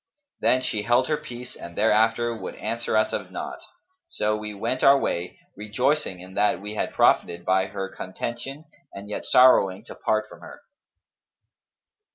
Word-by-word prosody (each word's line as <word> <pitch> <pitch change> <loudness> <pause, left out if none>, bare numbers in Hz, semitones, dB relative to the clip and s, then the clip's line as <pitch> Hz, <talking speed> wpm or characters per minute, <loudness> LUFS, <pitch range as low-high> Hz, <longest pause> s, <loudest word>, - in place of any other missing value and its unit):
Then 130 0 +2
she 110 -4 -1
held 120 +4 +2
her 155 - +3
peace 125 -3 -9
and 85 0 -10
thereafter 115 +2 +3
would - - -7
answer 115 -1 -2
us 110 - +2
of - - -3
naught; - - -6 0.5
so 110 - -1
we 105 0 -5
went 105 +5 -3
our 140 0 +7
way, 90 -8 -2 0.2
rejoicing 110 0 0
in 95 +1 -11
that 105 -3 +2
we 105 +2 -7
had 110 - -2
profited 85 0 +2
by 95 0 +2
her 95 -1 -4
contention 120 +10 -6 0.3
and 100 +1 -9
yet - - -4
sorrowing 105 -6 +5
to - - -9
part 110 0 -1
from - - -14
her." 290 - -12
110 Hz, 165 wpm, -25 LUFS, 100-125 Hz, 0.5 s, our